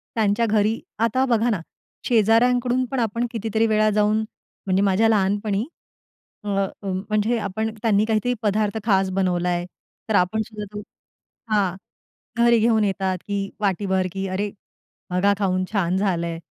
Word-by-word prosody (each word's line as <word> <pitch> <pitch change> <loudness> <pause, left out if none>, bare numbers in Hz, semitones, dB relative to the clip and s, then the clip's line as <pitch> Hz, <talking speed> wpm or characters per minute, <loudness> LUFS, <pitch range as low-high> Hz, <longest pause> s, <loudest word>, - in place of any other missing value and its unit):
त्यांच्या 220 +1 +2
घरी 215 +1 +1 0.2
आता 230 +4 +2
बघा 235 -2 +2
ना 205 -6 0 0.5
शेजाऱ्यांकडून 245 +3 +3
पण 265 - -1
आपण 230 +1 0
कितीतरी 225 0 0
वेळा 215 0 +3
जाऊन 210 0 +3 0.5
म्हणजे 190 0 +2
माझ्या 200 +3 +3
लहानपणी 205 +1 +1 0.8
अ, 210 - -8 0.4
म्हणजे 210 +4 0
आपण 220 +2 -3
त्यांनी 215 -2 +3
काहीतरी 225 +3 +1
पदार्थ 210 0 0
खास 195 -3 +3
बनवला 180 -2 0
आहे, 175 0 -1 0.4
तर 215 - +2
आपण 200 +4 +2
सुद्धा 215 -1 -6
तो 205 - -4 0.7
हां. 195 -4 +2 0.6
घरी 235 -1 +5
घेऊन 220 -1 +3
येतात 190 -2 -1
की 200 -1 -2
वाटीभर 190 -2 0
की 195 +1 -3
"अरे! 205 +2 -1 0.6
बघा 190 +3 +2
खाऊन 185 -2 +1
छान 185 -3 +1
झालंय. 170 -4 -1
210 Hz, 140 wpm, -23 LUFS, 195-225 Hz, 0.8 s, घरी